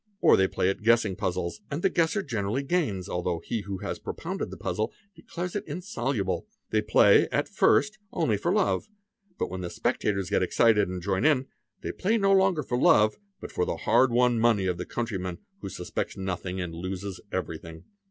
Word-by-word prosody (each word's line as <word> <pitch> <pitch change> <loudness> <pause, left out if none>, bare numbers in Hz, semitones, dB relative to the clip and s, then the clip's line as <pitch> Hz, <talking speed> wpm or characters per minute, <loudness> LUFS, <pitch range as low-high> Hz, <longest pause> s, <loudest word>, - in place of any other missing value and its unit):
Or - - +6
they 95 - +3
play 90 - 0
at 95 - -1
guessing 110 -3 +3
puzzles, 90 0 -3
and 145 +4 -4
the 195 - +4
guesser 170 +5 +1
generally 110 - -2
gains 135 - -1
although 90 -1 -2
he 115 - -2
whe 100 -2 -6
has - - -4
propounded - - -4
the - - -8
puzzle 110 +2 -2 0.2
declares 180 +2 -6
it 205 - -1
insoluble. 135 - -2 0.2
They 110 - +3
play, 105 - +5
at - - +1
first, 215 +1 +2
only 160 - +1
for 135 - -1
love, 210 +1 +1 0.5
but - - -2
when 95 0 -4
the 90 - -4
spectators 100 0 -1
get 100 - +3
excited 105 +2 +3
and 90 -1 -5
join 95 0 0
in, 140 -3 +3 0.3
they - - -3
play 215 +5 +1
no 195 -2 +3
longer 190 -5 +3
for 125 -1 -1
love 110 -3 +5 0.2
but - - -8
for - - 0
the 85 - -2
hard 120 +7 +3
won 120 -1 +3
money 110 -4 +3
of 90 -2 -1
the 90 - -5
countryman, 95 -7 -3 0.2
whi - - -6
suspects - - -4
nothing 95 0 -3
and 90 -2 -4
loses 95 +2 -5
everything. 80 -2 -5
105 Hz, 190 wpm, -27 LUFS, 95-140 Hz, 0.5 s, Or